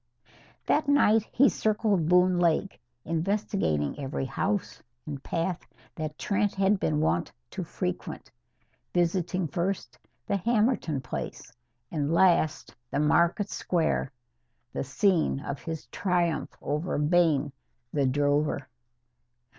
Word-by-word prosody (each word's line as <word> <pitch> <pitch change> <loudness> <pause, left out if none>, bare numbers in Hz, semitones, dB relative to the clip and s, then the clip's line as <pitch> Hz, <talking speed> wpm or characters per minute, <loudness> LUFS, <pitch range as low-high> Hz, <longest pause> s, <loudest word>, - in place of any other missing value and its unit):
That 305 0 +2
night 225 -7 +4
he 275 +3 +5
circled 210 -8 +1
Boone 180 0 +4
Lake, 175 +3 +1 0.2
investigating 165 - -1
every 135 -1 -3
house 195 +9 -2 0.2
and 140 -3 -6
path 170 +3 -2 0.3
that 155 -1 -5
Trent 205 0 0
had 195 +1 +2
been 155 -4 +1
wont 85 - +1 0.2
to - - -4
frequent, - - -5 0.6
visiting 175 0 +1
first 175 -2 -3 0.3
the 200 - 0
Hammerton 210 - +1
place 130 - -6 0.4
and 150 -1 -1
last 170 -3 +3 0.2
the 140 - -1
market 170 +7 +2
square 160 -5 0 0.6
the - - -2
scene 160 +1 +2
of 140 0 -5
his 160 -2 -5
triumph 175 -3 0
over 150 +5 -1
Bayne, 150 -2 +3 0.4
the 140 -3 +2
drover. 145 +3 +1
170 Hz, 115 wpm, -28 LUFS, 150-195 Hz, 0.6 s, he